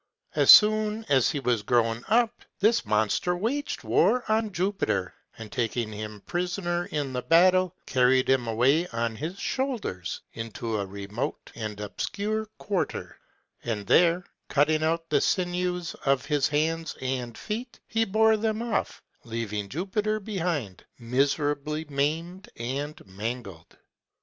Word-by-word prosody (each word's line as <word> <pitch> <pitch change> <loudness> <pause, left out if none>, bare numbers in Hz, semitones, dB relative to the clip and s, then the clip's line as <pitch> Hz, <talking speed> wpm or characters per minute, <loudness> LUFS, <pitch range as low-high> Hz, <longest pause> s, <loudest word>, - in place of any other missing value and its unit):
As - - +2
soon 215 +1 +7
as 135 -4 +4
he 145 - -1
was 125 -4 +1
grown 115 +1 +1
up, 235 +1 +2 0.2
this 220 - +3
monster 110 - +1
waged 255 - -2
war 190 - +3
on 220 0 +1
Jupiter, 180 - -1 0.2
and 110 -2 -9
taking 120 -3 -1
him 105 -1 -7
prisoner 175 0 -2
in 145 -3 -3
the 125 - -1
battle, 180 +4 +4
carried 130 0 +3
him 130 -3 +2
away 135 +10 +3
on 115 -3 -2
his 160 - -5
shoulders, 200 - -3
into 115 -1 -4
a 100 - -3
remote 100 +4 -5
and 110 -2 -5
obscure 210 - -3
quarter; 200 -3 -3 0.4
and 105 -4 -3
there, 175 - +4 0.2
cutting 155 +2 +3
out 165 +1 0
the - - +4
sinews 180 -2 0
of 135 -2 +2
his 145 -1 +2
hands 160 +1 -1
and 125 -3 -3
feet, 235 +4 -5
he 225 0 +1
bore 220 +1 +3
them 220 +1 -1
off, 235 -3 -2 0.2
leaving 110 -4 -4
Jupiter 205 - -1
behind 175 - -3
miserably 145 +5 0
maimed 160 +7 -2
and 140 +6 -4
mangled. 100 -3 -6
150 Hz, 135 wpm, -27 LUFS, 115-190 Hz, 0.4 s, soon